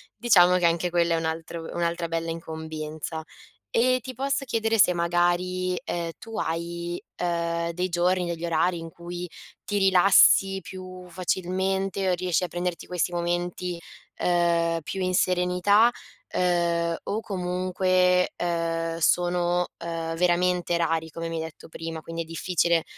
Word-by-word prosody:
diciamo 180 -6 +5
che 180 - +1
anche 170 +1 +2
quella 170 -1 +2
è - - 0
un 165 - -2
altro 165 +1 -4
un'altra 170 0 -1
bella 165 0 -2
incombenza. 160 -1 -5 0.5
E 255 +2 +3
ti 255 +2 -8
posso 275 +2 -1
chiedere 225 -2 0
se 180 - +6
magari, 175 +1 +1
ehm, 170 -1 -3
tu 225 -1 -8
hai, 170 +1 -3 0.2
uhm, 170 -1 -1
dei 180 +2 -1
giorni, 180 +1 +1
degli 170 -1 -4
orari, 170 +1 +1
in 165 - -7
cui 175 +1 -7 0.3
ti 205 - -2
rilassi 195 0 +5
più 185 0 -9
facilmente, 190 +2 -1
o - - +3
riesci 180 -1 0
a - - 0
prenderti 175 0 -4
questi 180 0 -1
momenti, 175 +1 -2 0.4
ehm, 170 -1 +2
più 190 +5 -5
in 185 0 0
serenità? 180 +5 +3 0.4
Ehm, 170 -2 +1
o 210 - -2
comunque, 180 -1 +1
ehm, 165 -1 -1
sono, 175 +1 +2
ehm, 165 -1 -4
veramente 180 0 +2
rari, 165 -1 0
come 165 +1 -5
mi 165 - -4
hai 160 - -2
detto 160 -2 -10
prima, 165 0 -6
quindi 165 +1 -5
è - - -16
difficile 170 0 +1
175 Hz, 145 wpm, -26 LUFS, 170-185 Hz, 0.5 s, se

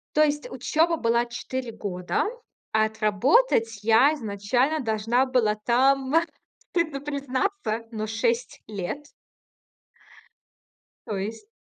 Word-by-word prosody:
То 305 - +6
есть 295 0 -1
учёба 320 +6 +1
была 235 -2 +2
4 240 0 -5
года, 180 -5 -2 0.5
а 220 0 +4
отработать 225 - +2
я 230 +7 +5
изначально 245 +6 0
должна 230 +3 +1
была 245 -5 +2
там, 265 +5 +2 0.6
стыдно 315 -5 -1
признаться, 280 - -2
но 215 0 -3
6 230 +2 -1
лет. 210 +8 -5 2.0
То 210 - -3
есть 220 - -5
240 Hz, 105 wpm, -25 LUFS, 220-280 Hz, 2.0 s, То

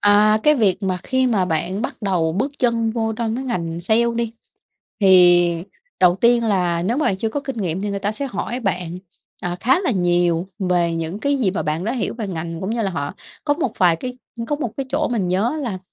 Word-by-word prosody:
À, 210 +1 +5
cái 300 - +5
việc 210 -7 +1
mà 190 -1 0
khi 260 +3 +1
mà 215 -7 +2
bạn 180 +4 -1
bắt 260 - -4
đầu 175 -5 +1
bước 250 - -1
chân 230 -2 +1
vô 225 -1 -1
trong 225 0 -2
cái 265 - -4
ngành 170 -9 -3
sale 220 +6 +2
đi, 230 -1 -2 0.7
thì 175 -3 +5 0.4
đầu 180 -1 +6
tiên 235 +2 +3
là 180 -5 +1
nếu 225 +8 0
mà 300 - +1
bạn 190 - +1
chưa 220 +4 -1
có 285 - -3
kinh 270 -3 -6
nghiệm 185 -4 -2
thì 205 +1 -2
người 200 - -2
ta 200 +2 -1
sẽ 275 +6 -4
hỏi 250 -1 -4
bạn, 180 -5 -2 0.4
à, 175 0 -2
khá 265 +9 +3
là 380 - 0
nhiều 175 -3 +1
về 175 -3 +1
những 165 +4 -3
cái 280 +5 +1
gì 235 -8 +1
mà 190 - -2
bạn 155 +3 -2
đã 225 - -1
hiểu 250 -4 -2
về 225 -3 -4
ngành 165 -2 -5
cũng 190 - -3
như 230 0 -1
là 195 - 0
họ 145 -5 -4 0.3
có 290 - +2
một 290 -7 -2
vài 175 -3 +4
cái 250 +8 -6 0.3
có 295 - 0
một 260 -6 -3
cái 275 - -3
chỗ 300 +3 0
mình 225 -6 -1
nhớ 190 +6 +1
á 315 - -4
là 235 -11 -3
205 Hz, 240 wpm, -21 LUFS, 175-235 Hz, 0.7 s, đầu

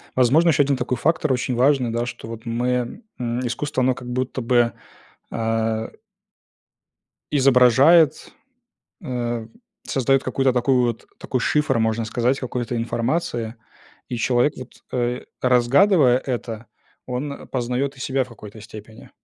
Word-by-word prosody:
Возможно, 140 +7 +4
еще 145 -2 +4
1 140 0 +1
такой 125 0 -2
фактор 155 +2 +1
очень 125 0 -1
важный, 130 0 +3
да, 120 +1 -1
что 120 - -8
вот 115 0 -8
мы, 125 - -2 0.2
м, 120 +1 -2
искусство, 130 +3 -2
оно 130 0 +3
как 125 0 -9
будто 130 +1 -2
бы, 120 0 +2 0.6
а 115 0 -1 1.4
изображает, 135 +4 +5 0.8
э, 120 -2 -3 0.4
создаёт 135 0 +1
какой-то 135 -1 +1
такой 125 +2 +2
вот 120 -2 0
такой 130 - -2
шифр, 150 0 +1
можно 110 0 0
сказать, 120 +4 0
какой-то 125 -1 -3
информации. 115 0 -2 0.5
И 125 - -3
человек, 125 +4 +2
вот, 130 -1 -8 0.2
э, 125 0 -1 0.2
разгадывая 130 +3 +4
это, 120 -3 -5 0.4
он 140 +3 -5
познаёт 130 +2 -2
и - - -14
себя 135 +1 0
в 130 - -7
какой-то 110 -2 -12
степени. 110 0 -12
125 Hz, 135 wpm, -22 LUFS, 120-135 Hz, 1.4 s, изображает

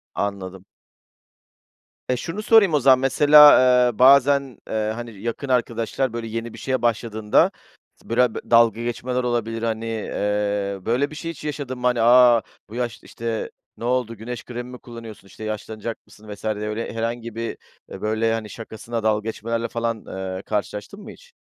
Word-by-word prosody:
Anladım. 95 -2 -4 1.4
Eee, 125 - +2
şunu 170 - -5
sorayım 215 -5 +5
o 150 - +4
zaman, 130 -1 +5
mesela, 145 +2 +7 0.3
eee, - - -18
bazen, 140 0 +5
eee, 110 -1 -1
hani, 115 -4 -8
yakın 115 +5 -4
arkadaşlar, 120 0 0
böyle, 115 -1 -4
yeni 115 +1 -5
bir - - -10
şeye 130 -1 -2
başladığında 110 -2 +1 0.4
s - - -21
bıra 120 0 +2
böyle, - - -8
dalga 115 -1 +5
geçmeler 125 +1 -2
olabilir, 115 -2 -2
hani. 115 0 -2
Eee, 105 -2 -2
böyle 125 +5 +1
bir - - -9
şey 165 +2 -5
hiç 150 - -12
yaşadın 140 -4 -5
mı, 125 - +1
hani? 125 -2 +1
A, 120 0 +6 0.3
bu 110 - -10
yaşta, 120 -1 -4
işte, 115 -1 -4 0.3
ne - - -10
oldu, 120 -1 0
güneş 120 +2 -7
kremi 120 0 -7
mi 125 - -8
kullanıyorsun, 115 -4 -11
işte, 110 - -12
yaşlanacak 110 +1 -5
mısın 110 0 -16
vs. 100 - -14
diye 110 - 0 0.2
öyle 110 +1 -4
herhangi 115 0 -4
bir, 115 0 -4 0.3
eee, - - -9
böyle, 110 +1 0
hani, 110 -2 -4
şakasına 115 +1 -6
dalga 110 0 +1
geçmelerle 115 +1 -3
falan, 115 -1 -3
eee, 95 0 -5
karşılaştın 105 - -4
mı 215 +1 -10
hiç? 485 0 -17
115 Hz, 175 wpm, -22 LUFS, 110-125 Hz, 1.4 s, mesela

